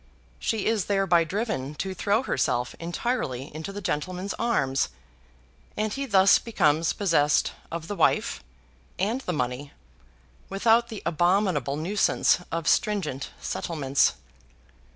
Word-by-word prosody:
She 220 -3 -1
is 220 -4 +1
thereby 195 -4 +3
driven 160 - -3
to 190 +4 -3
throw 205 +6 +1
herself 125 - 0
entirely 170 - -3
into 160 +5 -6
the 205 +1 -6
gentleman's 185 +3 -2
arms, 140 - +1 0.9
and 215 0 -1
he 275 0 -3
thus 195 -3 +6
becomes 160 -8 +1
possessed 160 -7 +2 0.2
of 165 -1 -5
the 205 - -4
wife - - +1 0.5
and 220 +8 0
the 185 - -3
money 130 -1 -3 0.8
without 225 +4 +3
the 220 -3 -7
abominable 175 - +1
nuisance 190 +6 +2
of 165 -2 -3
stringent 170 -11 0
settlements. 140 -5 0
180 Hz, 120 wpm, -26 LUFS, 150-210 Hz, 0.9 s, thus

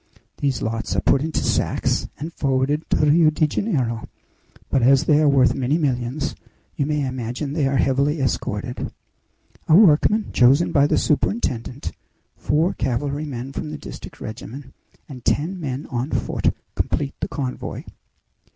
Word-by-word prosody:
These 140 -2 -1
lots 115 +1 -2
are - - +1
put 135 - +3
into 160 +1 -1
sacks - - 0
and 160 +4 -6
forwarded 140 +3 0
to - - +2
Rio 155 +2 +5
de 155 0 +2
Janeiro; 130 - -1 0.6
but 135 - +3
as 135 +4 +5
they 150 -2 +4
are 155 -1 +4
worth 135 -2 +4
many 135 +3 0
millions 130 -2 -1 0.4
you 140 - -1
may 150 -2 0
imagine 130 +2 -4
they 150 -3 +1
are 135 0 +1
heavily 140 +4 +2
escorted. 125 -1 -2 0.8
A 155 - +6
workman 205 +3 +5
chosen 135 +7 +4
by 145 0 +4
the - - +2
superintendent, 140 - -1 0.4
four 160 +5 +1
cavalrymen 135 0 -3
from 155 - -4
the 150 - -5
district - - -10
regiment, 115 +5 -8 0.3
and 130 -4 -10
ten 180 +6 0
men 135 -4 -4
on 125 +3 -2
foot, - - 0 0.2
complete 140 -1 -1
the - - -2
convoy. 130 -3 -4
140 Hz, 150 wpm, -22 LUFS, 130-150 Hz, 0.8 s, A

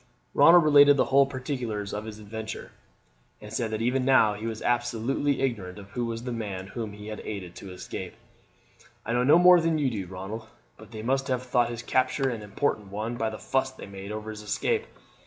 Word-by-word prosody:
Ronald 165 +4 +7
related 145 -1 +7
the - - +3
whole 140 0 +6
particulars 125 -6 -4
of 105 +1 -4
his 110 -1 -7
adventure, 110 +1 -7 0.7
and 105 0 -10
said 115 -1 -1
that 110 +1 -2
even 130 +2 +1
now 125 -5 +5
he 105 +2 -5
was 110 -1 -5
absolutely 120 +4 0
ignorant 105 -8 -2
who 100 +4 -5
was 115 0 -4
the 125 - -4
man 100 -5 -4
whom 110 +1 -6
he 105 +1 -9
had 110 - -6
aided 95 -5 -6
to 95 - -9
escape. 90 - -7 0.9
"I 115 - -2
know 120 +1 +2
no 145 +6 +6
more 180 0 +7
than 165 -1 +1
you 140 -4 +1
do, 100 -5 -4
Ronald, 95 +5 -7 0.3
but - - -14
they 110 -1 -8
must 135 +3 0
have 130 -2 -1
thought 120 -1 +1
his 120 0 -6
capture 130 +2 +1
an 115 -3 -5
important 105 0 -2
one 110 +4 -4
by 115 -1 -1
the 110 - -7
fuss 130 +3 0
they 130 - -11
made 100 0 -8
over 110 0 -5
his 105 0 -8
escape. 440 - -1
115 Hz, 210 wpm, -27 LUFS, 105-130 Hz, 0.9 s, Ronald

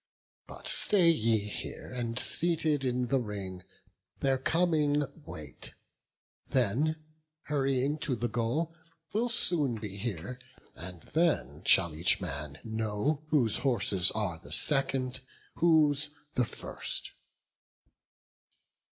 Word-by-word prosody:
But - - -6
stay 180 -5 +5
ye 115 -7 +2
here, 105 +4 -6
and 115 -1 -3
seated 155 -2 +2
in 125 -1 -1
the 135 - +2
ring, 100 -5 -6 0.6
Their 135 -1 +1
coming 150 -1 +2 0.2
wait; 75 -2 -8 0.7
they, 130 +6 +1 0.5
hurrying 135 0 0
to 145 -4 -1
the 120 +1 -1
goal, 120 +9 -1 0.4
Will 235 +4 +1
soon 160 - +3
be 105 -3 -7
here; 120 +3 -4 0.4
and 90 -1 -9
then 90 - 0
shall 85 -4 +4
each 80 +3 +2
man 70 0 -6
know 110 +6 -1
Whose 130 -9 +2
horses 105 -9 +3
are 100 -7 -2
the - - -13
second, 135 -3 +3 0.4
whose 155 -3 +4 0.2
the 125 - +2
first." - - -3
125 Hz, 110 wpm, -30 LUFS, 105-150 Hz, 0.7 s, stay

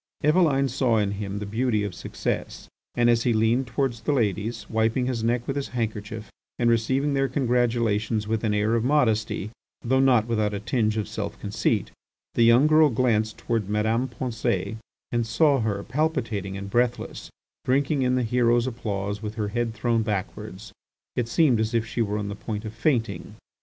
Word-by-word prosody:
Eveline 150 -3 +3
saw 125 -3 +1
in 100 -2 +1
him 100 0 -4
the 105 - -4
beauty 110 +1 0
of 100 -3 -3
success, - - -4 0.3
and 120 0 +3
as 120 -1 +4
he 120 0 +2
leaned 115 +4 +2
towards 120 -2 -1
the 115 - 0
ladies, 110 -2 -1
wiping 110 +3 +1
his 125 -3 -2
neck 120 +1 0
with 135 - -3
his 140 -1 -2
handkerchief 110 -2 -4 0.3
and 120 -1 +3
receiving 130 +5 +1
their 135 0 +2
congratulations 115 -5 0
with 110 0 -1
an 110 - +1
air 105 +2 +1
of 115 -1 +1
modesty 110 -6 +1 0.3
though 130 +2 +2
not 125 -5 +4
without 110 -3 0
a - - -3
tinge 110 +1 0
of 105 - -1
self - - -5
conceit, - - -1 0.4
the - - +1
young 115 +4 +6
girl 155 0 +5
glanced 110 -3 +1
towards 115 -4 -2
Madame 110 +4 +1
Pensée 115 -5 -2 0.3
and 120 -1 0
saw 140 +4 +3
her, 105 -3 -1
palpitating 120 - -2
and 100 0 -7
breathless, 120 +1 -1 0.3
drinking 140 +2 +1
in 125 0 +2
the 125 - +1
hero's 120 0 +2
applause 105 -4 -3
with 105 0 -5
her 105 -2 -2
head 120 +2 -1
thrown 115 +1 +1
backwards. 105 -1 -4 0.4
It 120 -2 -1
seemed 130 -3 +3
as 110 +1 -1
if 115 -1 +1
she 115 +1 -3
were 105 -1 0
on 105 -1 -3
the 100 - -4
point 105 0 -5
of 110 - -6
fainting. 115 0 -1
115 Hz, 185 wpm, -25 LUFS, 105-125 Hz, 0.4 s, young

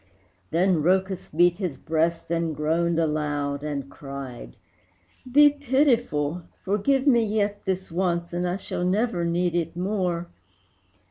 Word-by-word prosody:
Then 175 -1 +2
Rhœcus 190 +3 +1
beat 175 +3 +3
his 180 -8 -3
breast, 165 +1 -1
and 165 -2 0
groaned 165 +3 +1
aloud 145 -3 -1
And 145 -3 -3
cried, 135 - -8 0.8
"Be 290 +2 +7
pitiful! 245 - +1 0.2
forgive 255 +8 +1
me 240 -5 +5
yet 205 -1 -1
This 190 -2 -2
once, 170 -1 -1
and 175 +1 -1
I 180 - -1
shall 180 - -4
never 190 0 +1
need 170 +1 0
it 170 -1 -2
more!" 180 -3 -1
175 Hz, 130 wpm, -25 LUFS, 160-195 Hz, 0.8 s, Be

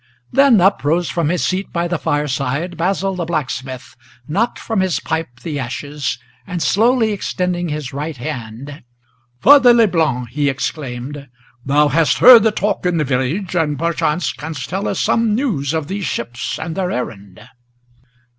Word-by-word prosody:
Then 270 -4 +5
up 195 -7 +3
rose 165 +4 +1
from 165 -3 0
his 180 +1 0
seat 190 +2 -2
by 170 0 -1
the 175 -2 -2
fireside 145 +2 -2
Basil 195 +3 -1
the 180 -2 -3
blacksmith, 135 -6 -4 0.3
Knocked 205 +10 0
from 225 -3 -2
his 190 -3 +1
pipe 160 -7 -4
the 150 -2 -4
ashes, 135 +2 -4 0.3
and 180 -2 -4
slowly 225 +1 +3
extending 180 -3 -2
his 150 -4 -5
right 150 +1 -4
hand, 130 +1 -7 0.6
"Father 255 -1 +7
Leblanc," 160 - +2
he 140 +3 0
exclaimed, 135 0 -5 0.3
"thou 145 +3 +3
hast 145 -3 +2
heard 245 -2 +9
the 220 +1 +3
talk 210 -1 -1
in 175 -1 0
the 155 - +1
village, 140 +9 -1
And, 150 -4 0
perchance, 165 +1 -1
canst 145 +1 -6
tell 190 +3 -2
us - - -2
some 230 -2 +2
news 205 - -1
of 160 -3 -2
these 195 +1 -4
ships 120 +3 -4
and 160 +1 -5
their 185 -2 -1
errand." 100 - -5
160 Hz, 160 wpm, -18 LUFS, 135-190 Hz, 0.6 s, heard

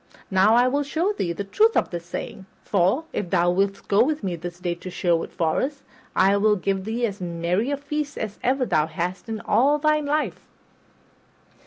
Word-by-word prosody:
Now 195 +4 +5
I 245 +1 +5
will 280 +3 +1
show 325 +8 0
thee 180 - -2
the 185 +4 -4
truth 435 - +3
of - - +1
this 170 -1 -6
saying; 190 +2 -6 0.2
for, 200 - +2
if 185 - -3
thou 175 -1 +3
wilt 195 +2 -1
go 205 +3 +4
with 300 -1 -1
me 185 -3 -1
this 175 +1 -7
day 175 -1 -1
to 175 +2 -9
Sherwood 175 -2 0
Forest, 260 - -1 0.3
I 195 +2 +4
will 210 +1 +3
give 195 0 -2
thee 230 +2 -1
as 200 -3 -5
merry 175 +6 -1
a 285 - -1
feast 290 +1 -4
as 215 -2 -5
ever 260 +1 +1
thou 155 -8 +2
hadst 180 +7 -4
in 220 -1 -4
all 285 +5 +3
thy 305 0 +2
life." 300 +1 -2
200 Hz, 195 wpm, -24 LUFS, 180-275 Hz, 0.3 s, Now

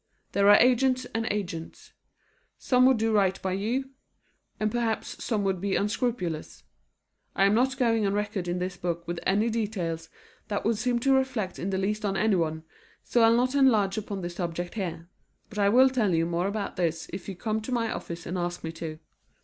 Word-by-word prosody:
There 200 0 +4
are 205 - +9
agents 255 +1 +3
and 225 0 -1
agents. 180 -6 -5 0.6
Some 255 0 +4
would 260 -2 +4
do 225 0 +1
right 195 -3 +2
by 190 - -1
you, 235 +8 -2 0.7
and 215 0 0
perhaps 230 -2 -2
some 215 -3 0
would 190 -2 -1
be 195 -1 0
unscrupulous. 205 - -2 0.7
I 195 - +4
am 200 - +4
not 260 +4 +2
going 225 -5 +2
on 195 - 0
record 205 -3 -2
in 175 +1 -1
this 180 0 -3
book 170 -2 -3
with 175 0 -3
any 210 +4 +2
details 180 -8 -3 0.4
that 205 -2 -3
would 225 -1 +1
seem 245 +1 +1
to 270 +2 +3
reflect 250 -8 0
in 185 - -2
the 190 - -1
least 210 +3 -1
on 195 -1 0
anyone, 170 -6 +1 0.4
so 240 - +1
I'll 225 +1 +6
not 255 +2 +1
enlarge 225 -8 +4
upon 205 -2 -4
this 175 0 -5
subject 175 -1 -3
here. 175 -5 -4 0.4
But 210 -1 -6
I 200 -1 +4
will 260 +4 +6
tell 215 -9 +1
you 165 0 +2
more 170 +2 -1
about 200 0 -4
this 165 -2 -1
if 190 +1 -6
you 195 - -5
come 215 +4 -2
to 220 - -6
my 230 -2 0
office 170 0 -6
and 180 +2 -3
ask 175 0 -3
me 160 - -3
to. 160 -1 -6
205 Hz, 200 wpm, -27 LUFS, 180-230 Hz, 0.7 s, are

